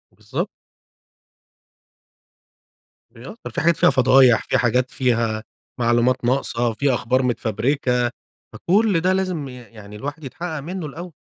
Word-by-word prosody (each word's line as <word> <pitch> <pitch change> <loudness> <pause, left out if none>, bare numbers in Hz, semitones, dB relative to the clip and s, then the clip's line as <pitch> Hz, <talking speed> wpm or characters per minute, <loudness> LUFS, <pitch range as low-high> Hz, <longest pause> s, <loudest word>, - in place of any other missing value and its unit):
بالضبط. - - -4 2.7
ي 115 - -12
آه، - - -9
في - - -3
حاجات 170 0 +3
فيها - - +5
فضايح، 130 -3 +5
في - - 0
حاجات 125 +2 +1
فيها 115 -4 0 0.4
معلومات 120 +1 +2
ناقصة، 120 -2 0
في 140 +4 +1
أخبار 125 +2 +1
متفبركة، 125 +1 0 0.4
فكل 200 -1 +2
ده 185 +2 +2
لازم 185 -6 -2
ي - - -9
يعني 105 -4 -12
الواحد 145 +7 -6
يتحقق 160 +3 -5
منه 175 +3 -5
الأول. 170 +4 -8
130 Hz, 130 wpm, -21 LUFS, 120-155 Hz, 2.7 s, فيها